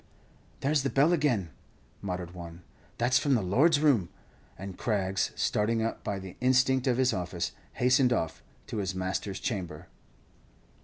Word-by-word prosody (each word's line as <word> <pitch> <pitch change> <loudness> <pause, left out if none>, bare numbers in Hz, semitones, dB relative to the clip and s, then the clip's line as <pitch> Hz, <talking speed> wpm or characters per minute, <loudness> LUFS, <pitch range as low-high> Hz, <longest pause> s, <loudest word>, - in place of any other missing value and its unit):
"There's 145 +1 +2
the 135 - 0
bell 145 +6 +4
again," 125 - +1 0.5
muttered 90 -3 -4
one, 85 -1 -9 0.3
"that's 120 +1 +3
from 140 -3 +2
the 110 - +1
'lord's 145 - +4
room;'" 130 - +3 0.5
and 95 0 -7
Craggs, 95 -3 0
starting 110 +2 +1
up 115 - -3
by 100 - -2
the 95 -1 -8
instinct 130 +1 +3
of 125 -2 +2
his 130 -1 +3
office, 90 -1 -2 0.2
hastened 125 +1 +3
off 80 -9 -1 0.2
to - - -5
his 95 -2 -2
master's 95 +1 -3
chamber. 90 -9 -4
105 Hz, 150 wpm, -29 LUFS, 95-130 Hz, 0.5 s, bell